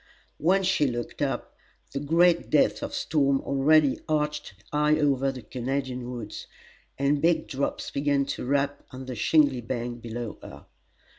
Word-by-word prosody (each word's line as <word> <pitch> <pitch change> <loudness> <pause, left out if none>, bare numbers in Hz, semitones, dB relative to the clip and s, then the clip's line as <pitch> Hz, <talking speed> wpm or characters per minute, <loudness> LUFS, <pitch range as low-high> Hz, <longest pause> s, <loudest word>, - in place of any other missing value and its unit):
When 190 +5 +3
she 180 -6 +2
looked 120 -1 -4
up, - - -2 0.4
the 140 - -3
gray 165 +5 +5
depth 155 -3 +1
of - - -4
storm 140 -3 +1
already 140 +1 +3
arched 150 -5 -1 0.2
high 150 +1 +3
over 135 -2 +2
the 130 -3 -9
Canadian 130 -1 -3
woods, 115 -4 -7 0.5
and 140 +1 +1
big 170 0 +2
drops 140 -1 -3
began 140 -1 +1
to - - -6
rap 140 +2 0
on 130 0 -8
the 130 - -5
shingly 140 +2 +3
bank 120 0 -4
below 115 -1 -6
her. - - -11
140 Hz, 150 wpm, -26 LUFS, 125-150 Hz, 0.5 s, gray